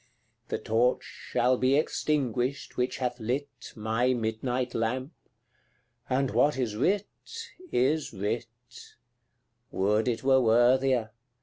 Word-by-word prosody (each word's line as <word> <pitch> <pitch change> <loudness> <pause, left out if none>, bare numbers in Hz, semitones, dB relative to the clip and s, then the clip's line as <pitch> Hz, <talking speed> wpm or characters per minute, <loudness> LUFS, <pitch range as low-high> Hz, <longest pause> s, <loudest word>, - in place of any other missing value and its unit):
The - - -2
torch 120 +3 +1
shall 125 +1 0
be 130 +2 +3
extinguished 140 -3 -1
which 125 0 -1
hath 125 -1 -2
lit 130 +6 -4
My 115 +3 +1
midnight 120 +2 -2
lamp 130 +5 -1 1.0
and 135 0 +1
what 130 +6 +3
is 120 -5 -1
writ, 190 - +1 0.7
is 150 +5 +1
writ 110 +4 -2 1.2
Would 105 +4 +1
it 115 -1 -1
were 130 0 +5
worthier! 120 0 +3
125 Hz, 110 wpm, -28 LUFS, 115-130 Hz, 1.2 s, were